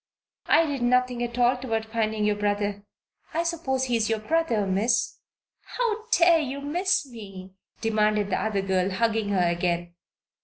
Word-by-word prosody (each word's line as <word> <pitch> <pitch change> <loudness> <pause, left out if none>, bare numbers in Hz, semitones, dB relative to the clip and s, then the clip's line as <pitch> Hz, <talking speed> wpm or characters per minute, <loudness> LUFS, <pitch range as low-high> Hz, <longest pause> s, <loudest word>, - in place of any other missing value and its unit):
I 330 - +5
did 285 -4 -3
nothing 250 0 +2
at 240 0 -3
all 245 +1 +3
toward 225 -3 -2
finding 220 -1 -1
your 210 0 +2
brother 205 0 -1 0.5
I 335 - +1
suppose 315 -6 -1
he 245 -2 0
is 220 -1 0
your 225 - +1
brother, 230 -3 0
Miss?" 205 +5 0 0.6
"How 455 -2 -1
dare 340 -6 +5
you 280 -2 -3
'Miss' 340 +4 0
me?" 195 -6 -10 0.3
demanded 215 -2 +1
the - - 0
other 205 -3 -1
girl, 190 -1 +1
hugging 220 +1 0
her 185 -3 +2
again. 175 0 -1
225 Hz, 160 wpm, -25 LUFS, 205-265 Hz, 0.6 s, I